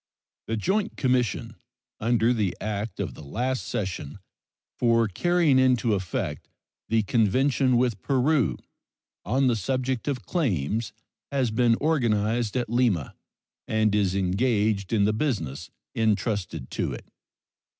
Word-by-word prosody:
The 115 - -1
joint 195 - -1
commission 120 -3 0 0.4
under 115 +1 +2
the 105 -6 -1
act 105 0 -4
of 90 -9 -3
the - - -12
last 125 - -2
session 95 -5 -4 0.6
for 115 -2 +3
carrying 165 - +2
into 125 -4 +3
effect 95 - -3 0.4
the 110 -1 +2
convention 125 +4 +2
with 120 -5 0
Peru 135 - +2 0.7
on 135 +2 +2
the 125 -2 +3
subject 130 +4 -2
of 135 -5 -2
claims 110 - -1 0.4
has 130 -5 +1
been 115 +1 +3
organized 115 -6 +1
at 125 - -1
Lima, 115 - +1 0.5
and 110 -1 +2
is 100 -3 +1
engaged 100 +1 +1
in 105 -3 +3
the 105 - +2
business 85 - -2 0.2
intrusted 105 - -1
to - - -2
it. - - -8
115 Hz, 125 wpm, -26 LUFS, 100-130 Hz, 0.7 s, for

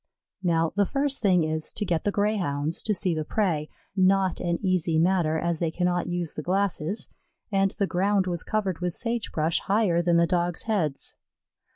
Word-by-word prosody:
Now 165 -3 +1
the 200 -1 +2
first 280 0 0
thing 185 -5 +4
is 155 0 -2
to 210 - -2
get 170 -3 -1
the 205 - +2
Greyhounds 175 -8 0
to 215 - 0
see 180 -1 +1
the 155 -1 -2
prey 160 -5 -1 0.3
not 190 -1 +3
an 170 -1 -1
easy 180 -3 +2
matter, 165 -2 +2
as 170 0 -1
they 170 - 0
cannot 175 +1 0
use 175 -2 -3
the - - -5
glasses, 190 +1 -1 0.4
and 195 -1 +3
the 200 - +2
ground 195 +1 +1
was 175 -2 -2
covered 200 -5 -2
with 180 -1 -2
sage 235 -1 -2
brush 160 +1 +1
higher 195 -4 +2
than 170 -1 +3
the 170 - +5
Dogs' 175 -1 -1
heads. 180 -11 -1
180 Hz, 185 wpm, -26 LUFS, 165-195 Hz, 0.4 s, the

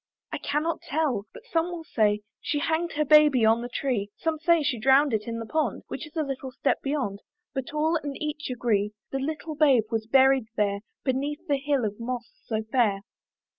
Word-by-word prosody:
I - - -3
cannot 300 +3 -1
tell; 275 -9 -1
but - - -13
some 330 0 0
will 345 -2 -6
say 210 -7 +1 0.2
She 295 - -1
hanged 325 +2 0
her 300 +1 +1
baby 295 -5 +6
on 225 +1 +4
the 245 - -5
tree, 245 -6 -1
Some 320 -1 -1
say 335 -1 +3
she 270 -5 0
drowned 270 +3 +4
it 210 0 -1
in 230 0 -3
the 230 - -5
pond, 285 -2 -1
Which 300 - -5
is 305 - -19
a 315 - +1
little 270 -2 -5
step - - 0
beyond, 275 -9 -2 0.3
But 265 -2 -4
all 310 +2 +1
and 290 -3 -5
each 300 -1 -4
agree, 215 -4 0 0.2
The 270 - -1
little 310 +3 -4
babe 285 -6 +4
was 220 -1 -1
buried 265 -1 +4
there, 200 -1 +1 0.2
Beneath 290 +5 -2
that 285 -2 +2
hill 280 -5 +2
of 210 +1 -4
moss 240 0 -4 0.2
so 220 -1 -1
fair. 220 -4 +1
270 Hz, 205 wpm, -26 LUFS, 230-300 Hz, 0.3 s, baby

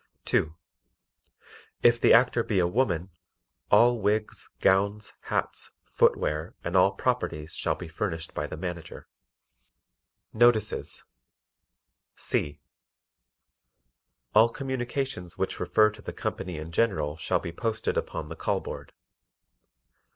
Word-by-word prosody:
(2) 80 +1 +1 1.3
If 120 0 +5
the - - +5
Actor 120 -1 +5
be 105 - 0
a 90 - +4
woman, 90 -3 0 0.6
all 120 0 +5
wigs, 105 +1 -1
gowns, 100 +2 +2
hats, - - -2
footwear 75 +3 +1
and 85 +2 -3
all 95 +1 +5
"properties" 95 -9 -2
shall - - 0
be 90 - -8
furnished 80 -1 -3
by - - -3
the - - -7
Manager. 90 -3 -6 1.3
Notices 110 -2 +2 1.1
C. 75 - -2 1.7
All 110 +2 +6
communications 130 -6 -3
which - - -2
refer 110 0 +3
to 105 0 -14
the - - -7
company 90 -3 -4
in 80 +2 -7
general 75 -7 +1
shall 80 - 0
be 85 - -6
posted 110 +5 -2
upon 75 - -3
the 80 - -7
call - - 0
board. - - -8
100 Hz, 115 wpm, -27 LUFS, 85-115 Hz, 1.7 s, All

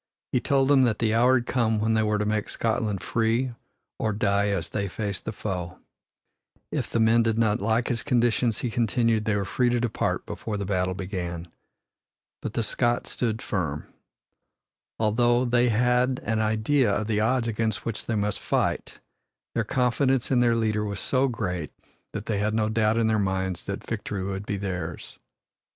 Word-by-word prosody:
He 125 - +2
told 135 +1 +2
them 140 -1 +5
that 115 -4 +2
the 110 -2 +1
hour 125 +3 +5
had 120 -1 +1
come 115 -4 +1
when 110 +1 +1
they 110 - +3
were 105 -1 +1
to 105 - -1
make 105 0 -1
Scotland 110 -4 -1
free 115 +4 0 0.5
or 110 -1 0
die 100 0 +1
as 100 -5 -1
they 100 -1 -2
faced 100 0 -4
the - - -2
foe. 90 -4 -4 0.9
If - - -2
the 115 - 0
men 115 +1 +5
did 115 -1 +1
not 110 -3 +2
like 115 +3 +1
his 115 -2 -1
conditions, 120 -4 +2
he 120 - -2
continued, 115 -1 +1
they 110 -2 +1
were 100 -1 -1
free 125 +6 +1
to 120 0 +1
depart 120 -2 -1
before 105 -2 -4
the 100 - -3
battle 95 -1 0
began. 90 -3 -5 0.9
But - - -4
the 115 - +1
Scots 120 +2 0
stood 115 -2 -2
firm. 80 -8 -3 1.0
Although 120 +3 +2
they 120 0 +3
had 125 +3 +2
an 110 +1 0
idea 110 +4 +2
of 105 +1 0
the 105 -1 0
odds 115 +2 +1
against 110 -1 -1
which 115 -2 -4
they 115 - 0
must 105 -2 -1
fight, - - -1 0.5
their - - +1
confidence 130 +1 +1
in 125 - +4
their 120 -1 +4
leader 110 -2 0
was 100 -2 -3
so 130 +5 +2
great 90 - -3 0.4
that 105 0 -5
they 105 -3 -1
had 110 +1 0
no 110 -1 +1
doubt 110 0 +2
in 115 - +2
their 110 -1 +2
minds 95 -2 -1
that - - -5
victory 100 -2 -3
would 95 +1 -4
be 100 - -1
theirs. 90 -4 -5
110 Hz, 185 wpm, -26 LUFS, 100-120 Hz, 1.0 s, them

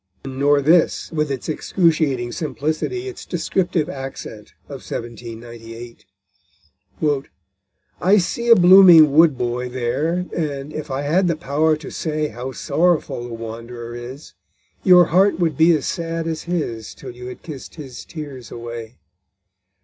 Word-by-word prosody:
Nor 140 +2 +2
this, 165 +3 +3
with 150 -2 -1
its 135 -3 -4
excruciating 155 -7 +1
simplicity, 155 - -3
its 385 - -8
descriptive 175 -2 -1
accent 135 -8 -8
of - - -9
1798: 115 0 -8 2.0
_I 200 +4 +5
see 235 +6 -2
a 230 - +10
blooming 175 -5 +8
Wood 155 -3 +5
boy 125 +1 -2
there, 135 +9 -1
And, 145 -3 -3
if 155 0 -6
I 135 +1 -2
had 175 +6 +2
the 170 - +1
power 155 0 +1
to 155 -1 -9
say 155 -1 -2
How 125 +4 -6
sorrowful 160 -5 0
the 115 - -6
wanderer 115 +1 -8
is, 125 +5 -9 0.5
Your 180 -1 +7
heart 190 +6 +3
would 170 -3 0
be 165 +2 +5
as 145 - -3
sad 165 -1 -3
as 160 -1 -4
his 120 -11 -3
Till - - -9
you 125 +1 -10
had 125 - -9
kiss'd 145 -5 -9
his 135 -6 -9
tears 140 -7 -9
away! 115 0 -8
145 Hz, 140 wpm, -21 LUFS, 120-165 Hz, 2.0 s, a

